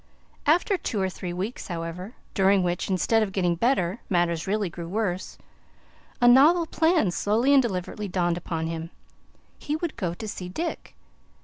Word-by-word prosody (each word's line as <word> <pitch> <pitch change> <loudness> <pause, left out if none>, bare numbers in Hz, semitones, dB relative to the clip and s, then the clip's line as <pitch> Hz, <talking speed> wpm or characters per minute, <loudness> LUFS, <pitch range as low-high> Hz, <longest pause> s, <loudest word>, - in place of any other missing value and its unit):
After 355 +6 +3
two 215 - -3
or 190 -1 +1
three 180 -1 -6
weeks, 190 +7 -4
however, 175 +5 -6 0.2
during 195 -1 +3
which, 175 +1 -1
instead 210 +4 +2
of 210 -3 -1
getting 180 -2 +1
better, 190 0 +1
matters 175 -2 +1
really 205 0 0
grew 170 0 -7
worse, 190 -1 -2 0.8
a 245 - +4
novel 300 +8 +6
plan 320 - +2
slowly 225 +9 +2
and 275 - +7
deliberately 205 -2 -3
dawned 175 -2 0
upon 165 -2 -3
him. 165 0 -4 0.7
He 295 - -2
would 330 0 -3
go 175 -6 -2
to 220 - -7
see 180 -3 -6
Dick. 330 - -5
195 Hz, 165 wpm, -25 LUFS, 175-240 Hz, 0.8 s, and